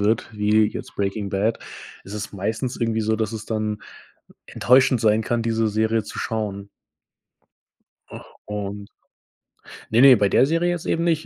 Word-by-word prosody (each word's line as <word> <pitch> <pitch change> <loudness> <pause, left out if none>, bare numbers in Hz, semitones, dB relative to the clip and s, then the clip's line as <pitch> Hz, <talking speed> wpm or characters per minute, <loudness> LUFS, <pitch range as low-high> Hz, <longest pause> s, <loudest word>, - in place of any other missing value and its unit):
wird 105 +2 +1
wie 105 +1 +3
jetzt - - -8
Breaking 100 0 -2
Bad, 105 +4 0 0.4
ist 100 - -9
es 105 0 -6
meistens 110 +6 -3
irgendwie 115 -1 0
so, 110 +1 +1
dass 110 -1 -2
es 110 -1 -6
dann 110 -1 -2 0.7
enttäuschend 130 -1 +3
sein 110 0 +3
kann, 120 +1 -1
diese 115 -1 0
Serie 110 +1 0
zu 105 - -9
schauen. 100 -3 -4 1.4
Ach, - - -10 0.2
und 100 -1 -6 1.0
ne 115 +2 +4
ne, 135 -1 +9
bei 105 - +2
der 130 - +4
Serie 165 +3 +1
jetzt 175 -2 -4
eben 165 - 0
nicht, 160 -2 0
110 Hz, 160 wpm, -22 LUFS, 105-115 Hz, 1.4 s, ne